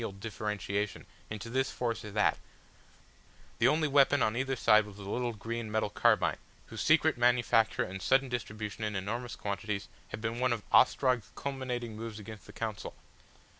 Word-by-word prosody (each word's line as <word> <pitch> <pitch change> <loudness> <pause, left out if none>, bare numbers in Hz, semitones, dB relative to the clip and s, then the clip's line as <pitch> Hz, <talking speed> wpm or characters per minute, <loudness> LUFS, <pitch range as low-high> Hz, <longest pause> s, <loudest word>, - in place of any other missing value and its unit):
They 115 - -2
had - - -8
no - - -15
artillery, - - -15
no 100 - -15
differentiation 105 -1 -3 0.2
into 105 +2 -6
this 130 +1 +1
force 120 -2 -3
or 105 - -7
that; 105 +1 +2 1.2
the 115 - +5
only 155 +3 +3
weapon 140 -1 +4
on 110 - +1
either 135 +2 0
side 110 -3 +4
was 105 -1 -12
the 100 - -9
little 120 +3 -1
green 115 +1 -5
metal 110 -1 0
carbine, - - +3 0.3
whose 110 -2 -7
secret 155 -3 +3
manufacture 120 -2 +3
and 95 +1 -6
sudden 135 +6 +3
distribution 110 -3 -4
in 105 -1 -2
enormous 115 +5 -3
quantities 100 0 -4 0.2
had - - -6
been 115 +1 -3
one 125 -1 +2
of 110 -3 -4
Ostrog's 125 -5 +4
culminating 125 -4 -4
moves 110 -1 -6
against 110 0 -10
the - - -10
Council. 110 -1 -5
115 Hz, 185 wpm, -31 LUFS, 105-125 Hz, 1.2 s, the